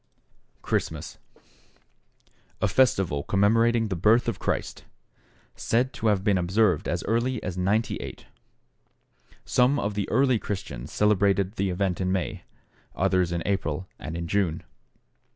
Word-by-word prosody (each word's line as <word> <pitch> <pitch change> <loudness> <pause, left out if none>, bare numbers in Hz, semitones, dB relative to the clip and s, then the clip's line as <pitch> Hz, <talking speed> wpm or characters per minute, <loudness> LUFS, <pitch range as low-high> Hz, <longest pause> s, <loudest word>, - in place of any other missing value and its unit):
=Christmas.= - - -3 1.4
A - - +2
festival 95 - +2
commemorating 115 +6 +2
the 95 - -1
birth 110 +7 +3
of - - -2
Christ. - - -3 0.7
Said 125 +3 0
to 115 - -2
have 100 -3 +2
been 100 -3 +2
observed 90 -1 +2
as - - -2
early 120 +4 0
as 90 - -4
98. 100 +5 -2 1.2
Some 125 +3 +3
of 100 +1 -2
the 100 -1 -3
early 130 -1 +3
Christians 70 -11 -6
celebrated 100 -2 +2
the 100 -3 -1
event 90 0 -1
in 95 0 0
May; 95 -2 -3 0.5
others 90 -2 +1
in 85 -1 -2
April 95 -3 -2
and 80 +2 -6
in 85 0 -4
June. 90 -3 0
100 Hz, 130 wpm, -26 LUFS, 90-115 Hz, 1.4 s, birth